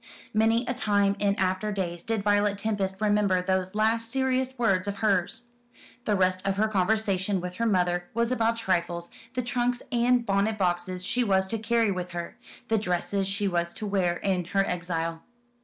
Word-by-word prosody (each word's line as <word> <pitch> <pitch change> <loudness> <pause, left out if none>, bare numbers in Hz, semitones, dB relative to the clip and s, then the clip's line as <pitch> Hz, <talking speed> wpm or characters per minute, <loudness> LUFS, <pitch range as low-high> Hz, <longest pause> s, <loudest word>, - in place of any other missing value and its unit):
Many 225 +3 +3
a 250 - -1
time 205 -5 +2
in 200 -1 +2
after 190 +3 0
days 175 -4 -3
did 225 -3 -1
Violet 205 0 +2
Tempest 200 -2 -1
remember 205 -3 +2
those 185 +1 -1
last 225 +1 +1
serious 260 0 0
words 195 -5 +1
of 200 - -2
hers. 200 +1 0 0.6
The 210 - +2
rest 185 -1 +1
of 195 0 0
her 215 +1 +3
conversation 200 -1 +1
with 180 0 -6
her 230 - +1
mother 175 -3 +1
was 235 +1 +1
about 230 -2 +1
trifles, 175 -5 -1 0.2
the 250 - 0
trunks 245 0 -1
and 245 0 +2
bonnet 200 +2 +1
boxes 180 -1 -1
she 250 - +1
was 190 -3 +2
to 225 - -1
carry 225 -1 +2
with 180 -2 -4
her 170 -1 -5 0.3
the 225 -1 +2
dresses 195 0 -1
she 200 +1 0
was 170 -2 -1
to 215 - -5
wear 185 -4 +1
in 185 -3 -1
her 195 +2 +1
exile. 165 -2 -3
200 Hz, 180 wpm, -27 LUFS, 185-225 Hz, 0.6 s, Many